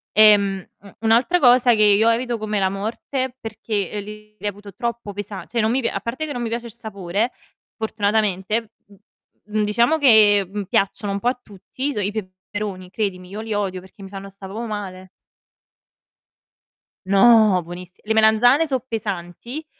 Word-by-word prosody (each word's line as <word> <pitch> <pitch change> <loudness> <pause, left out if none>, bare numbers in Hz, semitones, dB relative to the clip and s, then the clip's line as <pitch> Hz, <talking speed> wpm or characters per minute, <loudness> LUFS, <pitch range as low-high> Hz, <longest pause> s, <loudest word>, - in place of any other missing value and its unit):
Ehm, 200 -3 +5 0.2
m 200 - -14
un'altra 235 +11 +3
cosa 245 -2 +5
che 215 - +3
io 210 +2 +5
evito 240 +1 0
come 215 -1 -2
la 190 -1 +2
morte 240 +6 -4
perché 215 -2 -4
li 210 +1 -10
reputo 205 -1 -6
troppo 235 0 -4
pesa 200 -1 -6
cioè, 235 - -1
non 215 - +2
mi 260 +2 +1
pi 230 - 0
a - - -2
parte 260 +7 -4
che 295 - -5
non 245 - -4
mi 235 - -2
piace 235 +1 -4
il 230 - -9
sapore, 215 -1 -3 0.5
fortunatamente, 215 0 -1 0.2
m 200 - -18 0.6
mhmm, 215 - +2
diciamo 235 +9 +2
che, 215 -7 +6
mhmm, 205 0 -3
piacciono 200 +1 -1
un 200 - -2
po' 235 - -2
a 250 - -4
tutti, 245 +8 -5
so' 210 - -3
i 200 - -1
peperoni, 190 -1 -6
credimi, 185 -3 -3
io 205 +3 -6
li 220 -1 -4
odio 195 -3 -2
perché 190 +2 -17
mi 195 - -9
fanno 195 0 -8
sta' 195 0 -11
proprio 220 +5 -5
male. 190 -4 -6 2.0
No, 200 0 +5
buoniss 175 +1 -9
le 220 - 0
melanzane 225 +8 +4
so' 265 -3 0
pesanti 220 - -5
210 Hz, 175 wpm, -21 LUFS, 195-230 Hz, 2.0 s, che